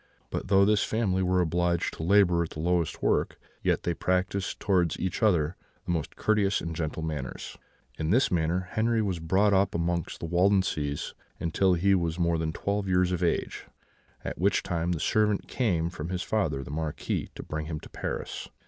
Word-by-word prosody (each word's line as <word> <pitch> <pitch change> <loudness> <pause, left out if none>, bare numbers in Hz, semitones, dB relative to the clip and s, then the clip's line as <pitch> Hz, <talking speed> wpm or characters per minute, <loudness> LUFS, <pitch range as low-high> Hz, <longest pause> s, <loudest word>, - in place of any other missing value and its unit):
But - - -3
though 100 0 +5
this 105 0 +3
family 100 -4 0
were 90 0 +2
obliged 85 0 0
to - - -7
labour 90 -1 +4
at 85 - -2
the - - -9
lowest 85 0 0
work, - - +1 0.2
yet - - +1
they 85 - 0
practised 95 +3 -1
towards 90 -5 +1
each 95 +3 -2
other 85 -6 +2 0.3
the 90 - -2
most 80 -4 -2
courteous 105 -2 +2
and 80 -1 -5
gentle 80 0 -3
manners. 75 -5 -5 0.4
"In 80 - -1
this 125 +9 +3
manner 90 +2 0
Henri 115 0 +1
was 95 -4 -2
brought 95 +5 +2
up 100 0 +2
amongst 85 0 -1
the - - -4
Waldenses 85 -5 +1 0.4
till 95 -2 +3
he 100 +3 +3
was 85 -3 0
more 85 -2 +1
than 80 -1 -1
twelve 100 +4 -2
years 90 -1 +2
of 90 -1 -1
age, 85 - -1 0.6
at - - -4
which 100 +3 +2
time 85 -1 -1
the 85 - -3
servant 105 +3 +1
came 85 -9 0
from 85 -2 -6
his 90 0 -2
father, 80 -11 -1
the - - -8
Marquis, 80 0 -3
to - - -7
bring 75 0 -4
him 80 -2 -4
to - - -12
Paris. - - -5
90 Hz, 190 wpm, -28 LUFS, 80-100 Hz, 0.6 s, though